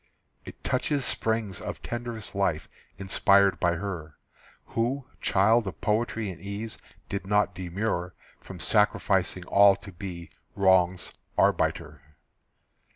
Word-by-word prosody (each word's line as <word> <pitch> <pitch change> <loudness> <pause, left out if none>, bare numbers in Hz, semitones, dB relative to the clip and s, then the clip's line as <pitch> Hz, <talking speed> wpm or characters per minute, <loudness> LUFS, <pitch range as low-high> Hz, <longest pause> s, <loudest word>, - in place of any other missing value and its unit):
It - - -12
touches 145 -3 0
springs 110 -4 0
of - - -6
tenderest 120 -2 -4
life 95 -6 0 0.3
Inspired 100 0 +3
by 85 -1 +2
her, 85 -4 -6 0.6
Who, 125 +4 -1 0.2
child 110 +3 +3
of 95 - -6
poetry 110 -1 -1
and 85 - -12
ease, 100 +3 -5 0.3
Did 100 -1 -4
not 105 +1 +2
demur 90 0 -3 0.2
From 95 - -11
sacrificing 95 -2 +2
all 100 0 +6
to 100 0 -12
be 85 -1 -8 0.2
Wrong's 95 -2 +3 0.2
arbiter. 75 -1 +1
100 Hz, 115 wpm, -27 LUFS, 90-110 Hz, 0.6 s, all